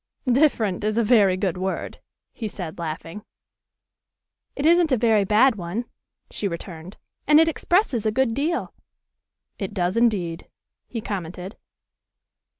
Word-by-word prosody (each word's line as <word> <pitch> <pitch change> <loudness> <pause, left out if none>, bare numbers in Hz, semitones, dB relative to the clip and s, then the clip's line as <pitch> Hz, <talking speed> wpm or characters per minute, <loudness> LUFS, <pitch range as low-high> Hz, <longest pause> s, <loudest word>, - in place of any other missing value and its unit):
"'Different' 240 -8 +2
is 215 +1 0
a 235 - +3
very 205 -5 +4
good 185 -3 -1
word," 190 +1 -4 0.3
he 225 - -5
said, 175 -5 -7
laughing. 165 +4 -6 1.3
"It 280 - -3
isn't 340 -1 +4
a 255 - +4
very 220 -2 +3
bad 220 +4 +4
one," 190 +7 -4 0.5
she 205 - -2
returned, 170 0 -8 0.3
"and 300 +1 +7
it 325 - +5
expresses 325 - +1
a 215 - +1
good 255 0 +1
deal." 300 +7 -2 0.9
"It 200 +1 -5
does 180 -1 0
indeed," 185 -8 0 0.4
he 230 - -5
commented. 185 -1 -6
210 Hz, 135 wpm, -23 LUFS, 185-250 Hz, 1.3 s, and